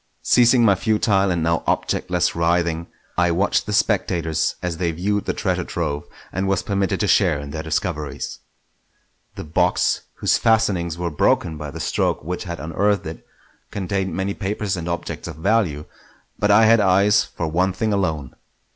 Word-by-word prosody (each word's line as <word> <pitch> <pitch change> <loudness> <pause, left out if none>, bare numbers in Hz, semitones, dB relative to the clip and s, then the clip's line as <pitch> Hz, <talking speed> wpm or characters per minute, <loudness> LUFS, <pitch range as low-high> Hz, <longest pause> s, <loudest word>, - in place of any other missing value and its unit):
Ceasing 120 0 +5
my 100 - +6
futile 100 -1 +1
and 85 -3 0
now 85 -1 +1
objectless 90 0 0
writhing, 85 0 0 0.3
I 90 0 +3
watched 95 +5 +1
the - - -3
spectators 85 -7 0
as 90 -2 -2
they 85 0 0
viewed 100 +5 -1
the - - -1
treasure 90 -3 -1
trove, 75 -4 -3 0.3
and 95 +2 -1
was 95 -1 0
permitted 100 -2 -1
to - - +1
share 75 - +3
in 70 0 -7
their 80 +1 -4
discoveries. 75 -3 -3 1.0
The - - -6
box, 90 +3 +1
whose - - +1
fastenings 100 -8 +1
were 85 -1 -3
broken 80 +2 +1
by 75 -1 -6
the 80 +3 -8
stroke - - -1
which 90 +4 -4
had 85 -1 -5
unearthed 100 +6 0
it, 80 +1 -8 0.4
contained 95 -1 -2
many 95 +1 -1
papers 100 -1 -2
and 85 -1 -5
objects 85 - -4
of - - -7
value; 80 -4 0 0.5
but 105 - +1
I 105 +2 +6
had 115 +1 +6
eyes 100 +1 +4
for 80 - -5
one 90 +4 +1
thing 110 +3 -1
alone. 80 -10 -2
90 Hz, 170 wpm, -21 LUFS, 80-100 Hz, 1.0 s, my